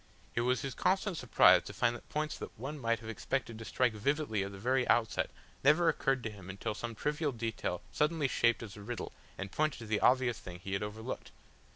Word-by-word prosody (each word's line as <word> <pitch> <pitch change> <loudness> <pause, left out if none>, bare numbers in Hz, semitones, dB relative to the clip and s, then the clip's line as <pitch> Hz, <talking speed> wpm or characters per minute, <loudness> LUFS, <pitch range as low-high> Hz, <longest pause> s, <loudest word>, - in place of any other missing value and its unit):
It 120 - +1
was 125 +1 +2
his 135 -2 -3
constant 190 0 +1
surprise 125 -6 +6
to - - -7
find 120 -1 +2
that - - -12
points 150 0 -1
that - - -8
one 140 +6 -5
might 115 -2 0
have 110 - -9
expected 115 0 -2
to 115 - -7
strike 125 -1 +2
vividly 110 -1 0
at 100 - -5
the 100 - -9
very 125 +5 +1
outset 115 -2 +2 0.3
never 155 +4 +6
occurred 135 -5 +1
to 115 - -3
him 100 -3 -11
until 100 +3 -3
some 115 +2 -5
trivial 150 +4 0
detail 115 -7 -3
suddenly 150 -1 +2
shaped 115 -2 +2
as 105 -5 -8
a 105 - -10
riddle 120 +2 -5 0.3
and 95 0 -5
pointed 155 -2 +1
to 115 - -8
the 105 -1 0
obvious 125 -2 +3
thing 90 -5 -8
he 95 +2 -6
had 95 - 0
overlooked. 110 +4 -5
120 Hz, 220 wpm, -33 LUFS, 110-140 Hz, 0.3 s, surprise